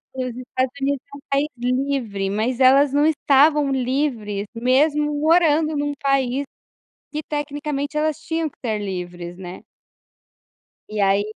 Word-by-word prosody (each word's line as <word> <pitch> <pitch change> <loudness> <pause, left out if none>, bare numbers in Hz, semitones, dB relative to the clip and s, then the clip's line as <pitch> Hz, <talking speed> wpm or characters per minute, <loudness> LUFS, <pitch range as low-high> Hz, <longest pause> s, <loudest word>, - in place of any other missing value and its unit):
os 255 -2 -4
Estados 255 0 -2
Unidos 275 0 0
é - - -7
um - - -15
país 280 +2 +2
livre, 245 -5 -1
mas 225 +5 -1
elas 270 +2 +5
não 290 +1 +3
estavam 295 -1 +4
livres, 250 -6 -1
mesmo 290 +5 +2
morando 315 -1 +3
num 290 0 -1
país 275 -1 +1 0.7
que 305 - -3
tecnicamente 290 0 -3
elas 305 0 0
tinham 325 +1 -2
que - - -23
ser 220 -3 0
livres, 175 -3 -6
né. 180 -1 -9 1.3
E 215 0 -4
aí, 195 0 +3
275 Hz, 135 wpm, -22 LUFS, 235-295 Hz, 1.3 s, elas